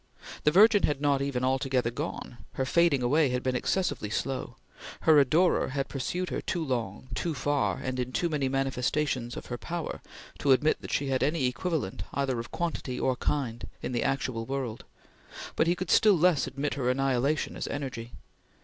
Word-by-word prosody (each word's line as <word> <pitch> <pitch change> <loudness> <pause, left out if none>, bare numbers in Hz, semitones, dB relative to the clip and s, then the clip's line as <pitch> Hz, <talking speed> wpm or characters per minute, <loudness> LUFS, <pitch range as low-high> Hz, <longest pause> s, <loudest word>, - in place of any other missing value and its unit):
The 150 - +6
Virgin 205 +4 +6
had 145 -4 +1
not 140 -1 +2
even 135 -3 -1
altogether 130 -2 +1
gone; 120 0 -5
her 130 - -1
fading 155 -2 +3
away 145 +4 +3
had 125 0 -1
been 130 -1 0
excessively 170 - -1
slow. 130 +4 -3 0.5
Her 155 -2 +6
adorer 160 +7 +3
had 135 -1 -2
pursued 180 +7 -3
her - - -2
too 170 -3 -2
long, 120 -3 -3
too 165 +5 -2
far, 145 +1 0
and 130 0 -3
into 125 0 -2
too 175 - +2
many 145 -4 0
manifestations 135 -1 -1
of - - -7
her 120 -1 -5
power, 170 -1 -4 0.4
to 140 -2 +5
admit 150 +4 +2
that - - -8
she 140 -1 0
had 130 -1 +1
any 150 0 +1
equivalent 125 - -2
either 135 -3 0
of 115 - -6
quantity 150 -7 -3
or 130 - +1
kind, 120 -6 -2 0.2
in - - -2
the 120 -2 0
actual 130 -4 -1
world, 130 -4 -4 0.7
but 160 - +2
he 175 - +3
could 180 -1 -3
still 210 -4 +6
less 170 -4 +3
admit 140 +2 -2
her 130 -3 -1
annihilation 135 +3 +1
as - - -4
energy. 125 -5 -5
135 Hz, 185 wpm, -28 LUFS, 125-150 Hz, 0.7 s, The